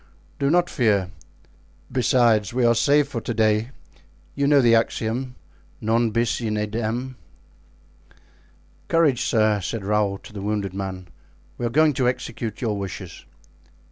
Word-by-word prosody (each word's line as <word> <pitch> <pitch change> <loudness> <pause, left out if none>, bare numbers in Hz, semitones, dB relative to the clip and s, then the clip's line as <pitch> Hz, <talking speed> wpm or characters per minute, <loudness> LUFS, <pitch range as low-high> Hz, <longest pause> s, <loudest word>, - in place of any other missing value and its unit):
"Do 140 -1 +1
not 175 +2 +3
fear. 100 - +1 0.8
Besides, 120 -5 +2
we 125 -1 +2
are 115 - +5
safe 140 +5 +3
for 115 -5 -4
to 120 - -3
day; 110 +1 +2 0.6
you 140 0 0
know 145 -1 +5
the 120 -3 +4
axiom, 115 +2 0 0.4
'Non 115 +2 +1
bis 115 +2 0
in 110 -2 -2
idem.'" 115 +4 -3 1.7
"Courage, 150 -7 +2
sir," 110 -3 +2
said 100 +2 -4
Raoul 105 -1 +1
to 105 - -15
the 100 - -6
wounded 100 -2 -2
man. 95 -1 -5 0.5
"We 120 - 0
are - - -2
going 155 +4 +3
to 125 -1 +2
execute 115 -2 -5
your 105 -4 -1
wishes." 95 -5 -7
115 Hz, 140 wpm, -23 LUFS, 105-125 Hz, 1.7 s, are